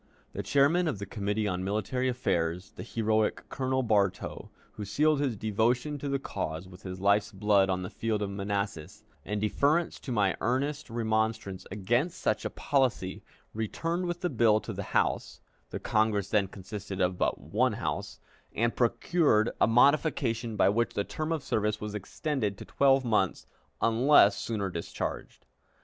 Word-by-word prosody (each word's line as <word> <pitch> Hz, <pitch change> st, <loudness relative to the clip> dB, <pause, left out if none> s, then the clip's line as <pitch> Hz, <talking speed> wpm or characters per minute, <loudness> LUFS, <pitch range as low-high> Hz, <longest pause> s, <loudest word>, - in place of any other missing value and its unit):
The -, -, -3 dB
chairman 155 Hz, +6 st, +3 dB
of 150 Hz, -, -1 dB
the 100 Hz, -, -5 dB
Committee 105 Hz, +1 st, -2 dB
on 90 Hz, -1 st, -2 dB
Military 110 Hz, +6 st, -1 dB
Affairs, 90 Hz, -7 st, -1 dB
the -, -, -10 dB
heroic 110 Hz, -2 st, 0 dB
Colonel 130 Hz, 0 st, -1 dB
Bartow, 100 Hz, -5 st, 0 dB, 0.2 s
who 105 Hz, -, -7 dB
sealed 150 Hz, +8 st, +2 dB
his 135 Hz, -6 st, 0 dB
devotion 120 Hz, +8 st, 0 dB
to 140 Hz, -, -4 dB
the 140 Hz, -, +1 dB
cause 80 Hz, -9 st, -4 dB
with 90 Hz, 0 st, -13 dB
his 95 Hz, -1 st, -7 dB
life's 100 Hz, +2 st, +2 dB
blood 100 Hz, -1 st, +3 dB
on 95 Hz, -1 st, 0 dB
the 90 Hz, -, -5 dB
field 110 Hz, -2 st, -1 dB
of 100 Hz, -, -3 dB
Manassas, 100 Hz, -4 st, -4 dB, 0.2 s
in 105 Hz, +1 st, -2 dB
deference 145 Hz, +10 st, +1 dB
to 130 Hz, -, -7 dB
my 100 Hz, -5 st, +2 dB
earnest 135 Hz, +6 st, -1 dB
remonstrance 110 Hz, -4 st, -1 dB
against 120 Hz, -, 0 dB
such -, -, 0 dB
a -, -, 0 dB
policy, 130 Hz, -10 st, 0 dB, 0.3 s
returned 165 Hz, -, -2 dB
with 175 Hz, 0 st, -3 dB
the 180 Hz, -, 0 dB
bill 110 Hz, -3 st, +4 dB
to 110 Hz, -, -6 dB
the 100 Hz, 0 st, -5 dB
House -, -, 0 dB, 0.3 s
(the -, -, -5 dB
Congress 105 Hz, -2 st, +1 dB
then 105 Hz, -3 st, +2 dB
consisted 95 Hz, 0 st, -7 dB
of 90 Hz, -1 st, +1 dB
but -, -, +1 dB
one -, -, +1 dB
House), -, -, -4 dB, 0.4 s
and 115 Hz, +1 st, +1 dB
procured 120 Hz, -1 st, +2 dB
a -, -, +6 dB
modification 120 Hz, -2 st, +2 dB
by -, -, +4 dB
which 115 Hz, +4 st, +1 dB
the 100 Hz, -, +1 dB
term 155 Hz, +9 st, -4 dB
of 160 Hz, -4 st, -1 dB
service 105 Hz, 0 st, 0 dB
was 105 Hz, -1 st, -5 dB
extended 105 Hz, -, -2 dB
to -, -, -9 dB
twelve 135 Hz, -1 st, +3 dB
months 105 Hz, -6 st, +1 dB, 0.4 s
unless 115 Hz, -3 st, +5 dB
sooner 100 Hz, -5 st, -3 dB
discharged. 85 Hz, -1 st, -5 dB
110 Hz, 165 wpm, -29 LUFS, 100-130 Hz, 0.4 s, a